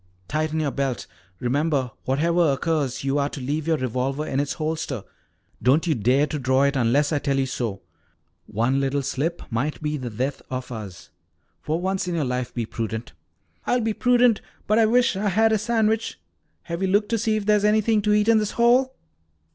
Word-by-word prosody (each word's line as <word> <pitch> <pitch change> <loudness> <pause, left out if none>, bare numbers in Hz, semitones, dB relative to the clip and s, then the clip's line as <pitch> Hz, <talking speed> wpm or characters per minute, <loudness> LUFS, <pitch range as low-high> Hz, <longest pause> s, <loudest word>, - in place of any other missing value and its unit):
"Tighten 155 +3 -1
your 150 -3 0
belt. 135 -5 -2 0.3
Remember, 135 0 0
whatever 165 +4 +2
occurs, 140 -3 -1
you 135 +1 +1
are 140 0 0
to - - -7
leave 145 +4 -2
your 160 -1 +2
revolver 130 +3 -2
in 135 - -1
its 145 0 -1
holster. 155 - -3 0.6
Don't 140 +7 +3
you 165 - +2
dare 130 +4 +2
to 150 0 -4
draw 130 +1 +2
it 140 +1 +2
unless 135 +4 +2
I 145 - +2
tell 140 -1 0
you 135 - +2
to. 115 -6 -3 0.7
One 115 +6 +1
little 140 +1 0
slip 140 +5 -2
might 130 +7 -1
be 150 -1 -2
the 130 -3 -5
death 130 +6 -3
of 130 0 -5
us. 100 -8 -8 0.5
For 155 +2 -1
once 190 0 -1
in 175 - -1
your 155 -4 0
life 125 -1 -2
be 120 -2 -3
prudent." 110 +1 -5 0.5
"I'll 250 - +2
be 220 -1 0
prudent, 245 -1 +3 0.2
but 215 +2 +3
I 225 - +5
wish 245 0 +3
I 205 +2 0
had 220 +4 +3
a 220 - +2
sandwich. 220 - 0 0.4
Have 170 +2 -5
you 190 - +1
looked 205 +2 +2
to 230 - +1
see 220 0 +1
if 215 -2 -2
there's 210 -1 +3
anything 215 +1 +3
to 210 0 +2
eat 210 0 +3
in 230 -1 +5
this 210 -1 -2
hole?" 250 +3 +3
150 Hz, 200 wpm, -24 LUFS, 130-210 Hz, 0.7 s, I